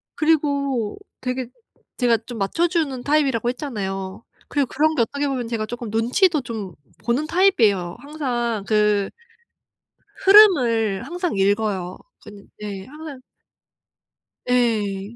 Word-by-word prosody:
그리고 280 -7 0 0.2
되게 255 -1 -3 0.5
제가 240 -3 +3
좀 240 -1 -7
맞춰 270 - +1
주는 300 -8 -1
타입이라고 275 -6 +1
했잖아요. 195 -7 -5 0.2
그리고 285 -2 0
그런 310 +5 +1
게 245 - +2
어떻게 280 +5 -1
보면 255 -4 -2
제가 225 -2 -2
쪼끔 235 0 -6
눈치도 255 - +2
좀 220 -7 -6 0.3
보는 260 +6 0
타입이에요. 220 - +2
항상 245 -7 -3
그 210 -2 +2 1.2
흐름을 250 - +6
항상 355 - -3
읽어요. 195 -2 0 0.3
근데 200 -1 -12
네 200 -2 -6
항상 300 -1 -10 1.3
예. 215 -4 0
240 Hz, 255 characters per minute, -22 LUFS, 210-290 Hz, 1.3 s, 흐름을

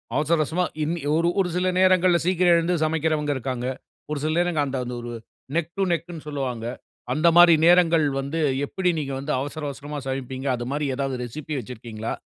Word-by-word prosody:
அவசர 155 +2 +2
அவசரமா 175 +4 0 0.2
இன்னிய 155 -1 -2
ஒரு 170 +1 +2
ஒரு 180 -2 +2
சில 180 +1 +1
நேரங்கள்ல 185 -2 +4
சீக்கிரம் 180 -1 +4
எழுந்து 170 +2 +1
சமைக்கிறவங்க, 155 -2 0
இருக்காங்க. 125 -1 -3 0.4
ஒரு 150 - -1
சில 155 - 0
நேரங்கள் 175 -5 +1
அந்த 135 0 -3
அந்த 125 - -5
ஒரு 120 0 -6 0.5
நெக் 170 0 -1
டூ 195 - +2
நெக்ன்னு 170 -1 -5
சொல்வாங்க. 130 -6 -3 0.5
அந்த 155 +4 +2
மாரி 175 -1 +9
நேரங்கள் 170 -3 +5
வந்து, 140 +4 -2 0.2
எப்டி 180 +4 0
நீங்க 140 -2 -4
வந்து 140 +3 -2
அவசர 145 +3 -5
அவசரமா 145 +1 -6
சமைப்பீங்க? 130 0 -4
அது 120 - -5
மாரி 150 0 -1
ஏதாவது 135 -1 -2
ரெசிபி 150 +4 -5
வச்சிருக்கீங்ளா? 115 -3 -6
150 Hz, 175 wpm, -24 LUFS, 135-170 Hz, 0.5 s, மாரி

